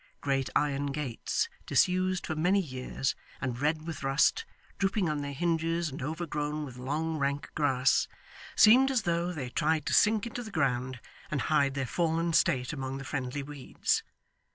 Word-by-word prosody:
Great 135 -2 0
iron 145 -1 +1
gates, 140 -4 -2 0.2
disused 185 0 +2
for 155 - -3
many 180 +6 +3
years, 130 -4 -2 0.3
and 125 -3 -3
red 155 +2 0
with 165 -4 -5
rust, 140 - +2 0.3
drooping 195 -1 +1
on 150 -2 -1
their 140 0 -4
hinges 165 +2 0
and 135 - -7
overgrown 150 0 -3
with 130 -3 -9
long 155 +5 -2
rank 140 +1 -1
grass, 130 -4 +2 0.5
seemed 250 +5 +7
as 255 -4 +1
though 170 +1 0
they 135 -8 -5
tried 155 0 +1
to - - -1
sink 215 0 +4
into 235 +1 -5
the 220 - -7
ground, 130 - -1 0.3
and 145 -4 -1
hide 140 -2 +3
their 135 -1 -1
fallen 165 +4 0
state 125 -2 +2
among 135 -1 -4
the 135 - -7
friendly 135 +1 -3
weeds. 145 -2 -1
150 Hz, 165 wpm, -30 LUFS, 135-170 Hz, 0.5 s, seemed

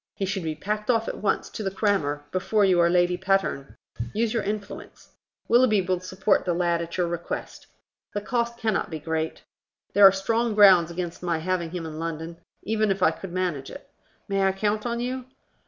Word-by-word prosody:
He 195 - -2
should 190 0 -2
be 160 -2 -3
packed 210 +6 -4
off 225 -2 +2
at - - -4
once 200 - 0
to - - -6
the 195 - -1
crammer, 190 -8 0
before 200 +3 +2
you 185 -2 +3
are 170 0 +5
Lady 175 0 +2
Patterne. 190 -7 -1 0.4
Use 225 +1 0
your 230 - +1
influence. 205 0 -6 0.4
Willoughby 235 -3 +4
will 180 0 0
support 185 +3 +1
the 175 -2 0
lad 170 -1 +1
at 170 +1 -6
your 180 - +2
request. 170 0 -5 0.5
The 205 - -1
cost 235 +1 -1
cannot 220 -3 -1
be 160 - -4
great. 160 +1 -3 0.5
There 200 -1 +9
are - - +7
strong 225 +4 0
grounds 190 -5 +7
against 170 0 -5
my 175 -2 0
having 170 0 -2
him 170 -1 -5
in 155 -1 -7
London, 165 0 -5 0.3
even 215 0 0
if 190 -1 0
I - - +5
could 190 - -9
manage 175 -7 -2
it. 280 - -11 0.4
May 195 -1 0
I 195 0 +3
count 210 +3 -1
on 235 0 -2
you?" 250 +1 -3
190 Hz, 200 wpm, -25 LUFS, 170-210 Hz, 0.5 s, There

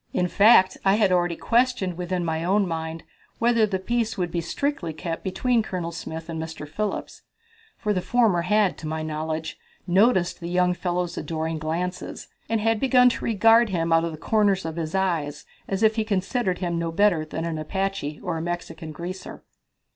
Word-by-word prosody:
In 180 - +1
fact, 200 0 +5
I 195 0 +4
had 205 -3 +3
already 175 -1 +2
questioned 235 -6 +1
within 180 0 -2
my 160 0 -1
own 195 +2 +2
mind 160 -1 -4 0.3
whether 230 -2 +3
the 195 -2 -1
peace 230 +3 -1
would 175 -2 -1
be 170 - -1
strictly 180 - -2
kept 165 +1 -5
between 230 +5 +1
Colonel 180 -5 -4
Smith 160 0 -7
and 165 -1 -4
Mr. 160 -2 -7
Phillips, 205 +7 -4 0.6
for 210 - -1
the 185 - 0
former 220 -6 +2
had, 205 +2 +2
to 155 - -6
my 155 0 -3
knowledge, 155 +1 -4 0.3
noticed 185 0 +3
the 170 - -5
young 180 0 +2
fellow's 175 -1 -2
adoring 160 +1 -3
glances, 170 +4 -4 0.2
and 225 - +1
had 225 0 +2
begun 250 -1 +5
to - - -4
regard 225 +1 +4
him 165 -3 0
out 165 0 +4
of 170 - -2
the 155 - -8
corners 200 0 +1
of 160 -1 -4
his 165 +1 -3
eyes 170 -7 -1 0.2
as 195 +2 -1
if 220 +1 +4
he 220 - +2
considered 200 -1 -1
him 170 -2 -2
no 165 0 -2
better 175 -3 +3
than 160 +1 -5
an 165 -2 -3
Apache 190 -2 -3
or 175 -2 -2
a - - -3
Mexican 165 -2 -5
greaser. 180 +4 -7
180 Hz, 190 wpm, -24 LUFS, 165-210 Hz, 0.6 s, fact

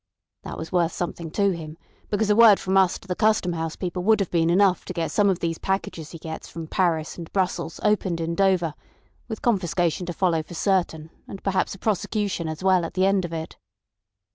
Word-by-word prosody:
That - - -7
was 160 - -7
worth 175 -2 +2
something 170 -1 -4
to 200 +4 +2
him, 160 -2 -7 0.3
because 210 0 +1
a - - +4
word 220 -3 +7
from 190 0 -1
us 190 -2 +4
to - - -18
the 180 - -1
Custom 215 -4 +2
House 160 -1 -3
people 180 -1 -3
would 220 +2 +4
have 195 - -1
been 165 -1 +2
enough 185 +1 +3
to - - -5
get 165 -2 -2
some 205 -1 +3
of 185 - 0
these 165 -1 -2
packages 190 -5 -3
he 165 - -9
gets 160 0 -7
from 165 -1 -7
Paris 165 -2 0
and 165 - -8
Brussels 180 -4 -1
opened 195 -5 +1
in 165 0 -2
Dover, 180 -3 +2 0.5
with 220 -3 -6
confiscation 180 -5 0
to 175 - -3
follow 170 -3 +1
for 165 +2 -11
certain, 165 -4 0 0.2
and 195 - -9
perhaps 195 0 0
a - - -12
prosecution 205 -3 -1
as 155 +2 -5
well 185 -2 +4
at 165 - -6
the 185 0 +3
end 195 -2 +2
of 170 - -7
it." 160 -1 -6
180 Hz, 215 wpm, -24 LUFS, 165-195 Hz, 0.5 s, word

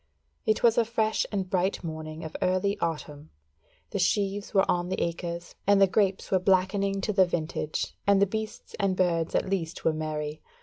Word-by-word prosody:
It 215 - +2
was 235 0 +5
a - - +5
fresh 220 -1 0
and 195 -3 -1
bright 185 +1 0
morning 155 -1 -6
of 160 - -7
early 185 +2 +1
autumn, 150 -2 -4 0.6
the - - -2
sheaves 200 0 0
were 195 -2 +4
on 175 0 0
the 190 - -2
acres, 170 0 -3
and 200 -1 +5
the 195 - +8
grapes 195 0 0
were 190 - +4
blackening 195 +1 +2
to 210 - -1
the 190 -2 +5
vintage, 155 -2 -2
and 200 -1 +5
the 200 - +5
beasts 220 +2 -5
and 195 -2 +1
birds 170 -3 +1
at - - +1
least 175 -4 -3
were 160 - +4
merry. 155 -1 -4
185 Hz, 185 wpm, -27 LUFS, 165-200 Hz, 0.6 s, the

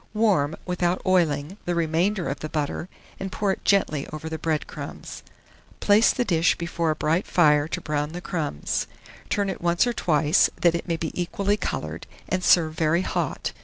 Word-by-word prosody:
Warm, 190 -9 +2
without 180 0 0
oiling, 170 -2 +1
the 175 - -1
remainder 170 +4 +1
of 140 - -3
the 155 - -5
butter, 155 +3 -3 0.3
and 195 0 -4
pour 200 +1 0
it - - -5
gently 155 -8 +2
over 155 +1 -6
the 160 0 -5
bread 155 -1 -1
crumbs. - - -8 0.6
Place 210 +2 +5
the 245 - -1
dish 165 -4 +2
before 170 -1 -2
a 155 - +1
bright 160 +5 0
fire 150 -4 +4
to 180 - -3
brown 150 -3 -2
the 175 - -4
crumbs; 160 - -2 0.4
turn 205 -1 0
it 195 - -4
once 175 +4 +2
or 240 - 0
twice, 155 -4 +3
that 170 -1 +4
it 170 - -3
may 165 -1 0
be 160 -1 -3
equally 200 +2 0
coloured, - - -4 0.2
and 185 0 -1
serve 160 -3 +4
very 160 +3 +1
hot. - - -2
170 Hz, 185 wpm, -25 LUFS, 155-185 Hz, 0.6 s, Place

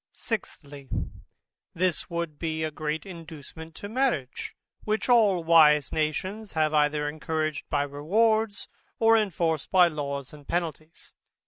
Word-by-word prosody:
Sixthly, 145 - -6 0.9
This 180 -1 0
would 170 -3 -4
be 160 -1 -2
a 155 - -2
great 155 +2 -3
inducement 160 -2 -10
to 205 - -7
marriage, 220 - -1 0.3
which 215 +1 -1
all 210 -8 +4
wise 155 -3 +5
nations 185 +7 -2
have 155 -1 +1
either 150 0 +2
encouraged 155 0 -3
by 145 -2 +1
rewards, 205 +10 +1 0.3
or 225 0 +5
enforced 170 -8 0
by 180 -2 +6
laws 140 -3 -5
and 145 -2 -14
penalties. 165 -1 -4
160 Hz, 125 wpm, -27 LUFS, 150-190 Hz, 0.9 s, by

